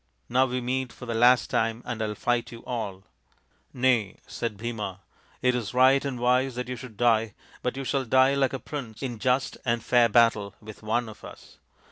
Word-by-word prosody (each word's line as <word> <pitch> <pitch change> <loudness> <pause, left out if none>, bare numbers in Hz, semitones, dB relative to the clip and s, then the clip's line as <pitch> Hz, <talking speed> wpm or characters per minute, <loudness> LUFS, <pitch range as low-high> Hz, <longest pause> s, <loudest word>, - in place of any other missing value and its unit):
Now 130 +2 +3
we 125 0 -2
meet 130 +1 -2
for 125 - -11
the 120 - -3
last 120 +1 +4
time 115 +1 0
and 120 -2 -4
I 110 - 0
will 105 - -4
fight 120 +1 -1
you 115 -1 -11
all." 105 -6 -4 0.4
" - - -42 0.3
Nay," 125 -6 +1
said 115 -3 -4
Bhima, 105 -4 -5 0.2
" - - -32
it 125 0 +4
is 125 -1 -3
right 130 +2 +5
and 135 -4 -3
wise 125 +1 +2
that 125 0 -4
you 125 - -4
should 120 -3 -11
die, 115 -2 +2 0.3
but 125 - -2
you 135 - -3
shall 135 0 -1
die 130 +3 +4
like 135 -2 +1
a - - -1
prince 125 -4 -7
in 120 -4 -4
just 130 +3 0
and 115 -2 0
fair 120 -1 +4
battle 105 -3 +3
with 110 0 -11
one 115 +2 0
of 110 - -12
us. - - -13
120 Hz, 215 wpm, -26 LUFS, 110-130 Hz, 0.4 s, right